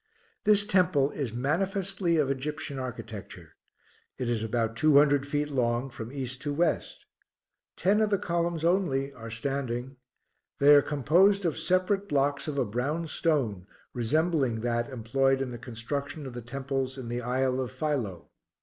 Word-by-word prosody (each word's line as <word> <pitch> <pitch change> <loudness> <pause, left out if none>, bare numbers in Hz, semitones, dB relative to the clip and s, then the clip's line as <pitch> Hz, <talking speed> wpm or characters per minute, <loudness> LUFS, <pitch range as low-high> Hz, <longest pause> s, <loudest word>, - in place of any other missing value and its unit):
This 210 -1 +5
temple 180 -8 +3
is 135 -6 -3
manifestly 180 - 0
of 140 -3 +2
Egyptian 145 +1 -4
architecture; 130 -2 -8 0.6
it 125 - -3
is 110 -2 -1
about 115 0 -1
two 155 +3 +5
hundred 145 -1 +4
feet 145 +1 -1
long 125 0 0
from 115 0 -7
east 130 -2 -5
to 145 - -2
west; 165 +3 -1 0.7
ten 200 +4 +3
of 215 - +2
the 200 - +2
columns 170 -2 -1
only 140 -7 +1
are 115 -2 -9
standing; 130 +1 -3 0.6
they 145 +1 +7
are 145 - +8
composed 175 +9 +3
of 165 - +1
separate 190 +2 +1
blocks 140 +1 +1
of 150 -2 -3
a 135 - +2
brown 135 +10 -2
stone 130 - 0 0.3
resembling 135 -1 +1
that 120 +1 -1
employed 135 +2 +1
in 135 -2 -3
the 120 - -7
construction 140 +6 -5
of 130 - -7
the 120 - -6
temples 135 +2 -3
in 130 -3 -6
the 120 +1 -3
isle 130 +1 0
of 125 -4 -4
Philoe. 125 - -3
140 Hz, 160 wpm, -28 LUFS, 125-160 Hz, 0.7 s, are